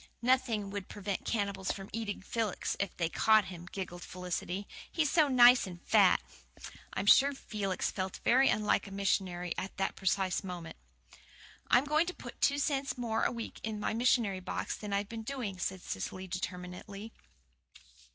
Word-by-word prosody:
"Nothing 235 Hz, -5 st, +2 dB
would 200 Hz, -1 st, -5 dB
prevent 200 Hz, -1 st, -4 dB
cannibals 200 Hz, -4 st, -1 dB
from 195 Hz, -1 st, -6 dB
eating 220 Hz, -4 st, -3 dB
Felix 220 Hz, -2 st, -2 dB
if 200 Hz, -, -2 dB
they 170 Hz, -, +1 dB
once 165 Hz, -, -5 dB
caught 220 Hz, -2 st, +5 dB
him," 175 Hz, -2 st, -9 dB
giggled 175 Hz, -2 st, -5 dB
Felicity. 180 Hz, +2 st, -4 dB, 0.2 s
"He's 305 Hz, -3 st, +1 dB
so 315 Hz, -3 st, +5 dB
nice 250 Hz, -3 st, +7 dB
and 175 Hz, -2 st, -8 dB
fat." -, -, +5 dB, 0.7 s
I -, -, -3 dB
am -, -, -4 dB
sure 275 Hz, +6 st, +7 dB
Felix 200 Hz, -7 st, -2 dB
felt 185 Hz, 0 st, -4 dB
very 260 Hz, +3 st, +5 dB
unlike 210 Hz, 0 st, +1 dB
a -, -, -10 dB
missionary 185 Hz, -3 st, 0 dB
at 190 Hz, -, -6 dB
that 195 Hz, -, -1 dB
precise 190 Hz, 0 st, 0 dB
moment. 175 Hz, -3 st, -7 dB, 0.9 s
"I'm 250 Hz, +3 st, +5 dB
going 305 Hz, +3 st, +2 dB
to 360 Hz, -, -4 dB
put -, -, -10 dB
two 280 Hz, -, +3 dB
cents 280 Hz, -2 st, 0 dB
more 230 Hz, -2 st, -1 dB
a -, -, +2 dB
week 230 Hz, -1 st, -6 dB
in 215 Hz, -1 st, -4 dB
my 210 Hz, -, -1 dB
missionary 225 Hz, -4 st, +2 dB
box 185 Hz, -, -3 dB
than 210 Hz, -1 st, -7 dB
I've 200 Hz, 0 st, 0 dB
been 225 Hz, +1 st, -6 dB
doing," 225 Hz, -6 st, -4 dB
said 190 Hz, +1 st, -3 dB
Cecily 185 Hz, 0 st, -4 dB
determinedly. 180 Hz, +3 st, -6 dB
200 Hz, 170 wpm, -32 LUFS, 185-235 Hz, 0.9 s, nice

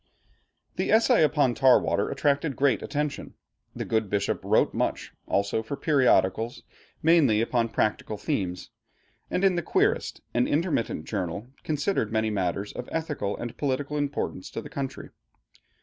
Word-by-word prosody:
The -, -, 0 dB
essay 225 Hz, -2 st, +5 dB
upon 145 Hz, -4 st, +3 dB
Tar 130 Hz, +1 st, +5 dB
water -, -, 0 dB
attracted 140 Hz, +1 st, 0 dB
great 135 Hz, -5 st, +2 dB
attention. 150 Hz, 0 st, -3 dB, 0.4 s
The -, -, -4 dB
good 110 Hz, -3 st, 0 dB
bishop 100 Hz, 0 st, -1 dB
wrote -, -, +2 dB
much -, -, -2 dB
also 100 Hz, +2 st, 0 dB
for 110 Hz, +6 st, -5 dB
periodicals, 120 Hz, -, +2 dB, 0.4 s
mainly 155 Hz, -10 st, +5 dB
upon 115 Hz, 0 st, +1 dB
practical 110 Hz, -1 st, -1 dB
themes; 90 Hz, -2 st, -3 dB, 0.6 s
and 185 Hz, -, -1 dB
in 195 Hz, -1 st, +5 dB
The 175 Hz, -, 0 dB
Querist, -, -, 0 dB
an 120 Hz, +1 st, +2 dB
intermittent 145 Hz, -, -1 dB
journal, 100 Hz, +3 st, -4 dB
considered 150 Hz, -, -1 dB
many 110 Hz, 0 st, +1 dB
matters 100 Hz, 0 st, -2 dB
of 125 Hz, -, -7 dB
ethical 150 Hz, -11 st, -2 dB
and 120 Hz, 0 st, -6 dB
political 145 Hz, +1 st, -1 dB
importance 145 Hz, -9 st, -3 dB
to -, -, -5 dB
the -, -, -9 dB
country. 135 Hz, -2 st, -5 dB
125 Hz, 145 wpm, -26 LUFS, 110-150 Hz, 0.6 s, essay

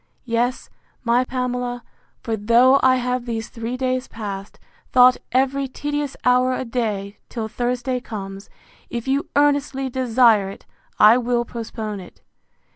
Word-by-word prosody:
Yes, 240 Hz, +1 st, -1 dB, 0.3 s
my 240 Hz, +1 st, +3 dB
Pamela; 250 Hz, -1 st, -3 dB, 0.4 s
for 225 Hz, -, -1 dB
though 235 Hz, +6 st, +5 dB
I 260 Hz, 0 st, +5 dB
have, 250 Hz, -1 st, -2 dB
these 225 Hz, -1 st, -3 dB
three 230 Hz, +2 st, -5 dB
days 255 Hz, 0 st, -1 dB
past, 200 Hz, -3 st, -7 dB, 0.3 s
thought 250 Hz, 0 st, +6 dB
every 270 Hz, +2 st, +1 dB
tedious 290 Hz, +1 st, -3 dB
hour 250 Hz, +1 st, +4 dB
a 260 Hz, -, -3 dB
day, 215 Hz, -4 st, -3 dB
till 225 Hz, -3 st, -4 dB
Thursday 245 Hz, +2 st, -2 dB
comes, 195 Hz, -5 st, -8 dB, 0.4 s
if 235 Hz, +1 st, -5 dB
you 275 Hz, +2 st, 0 dB
earnestly 285 Hz, -2 st, +1 dB
desire 235 Hz, -5 st, +3 dB
it, 195 Hz, -, -11 dB, 0.3 s
I 220 Hz, +4 st, +7 dB
will 240 Hz, 0 st, 0 dB
postpone 220 Hz, -3 st, -5 dB
it. 180 Hz, -, -14 dB
245 Hz, 135 wpm, -22 LUFS, 225-255 Hz, 0.4 s, I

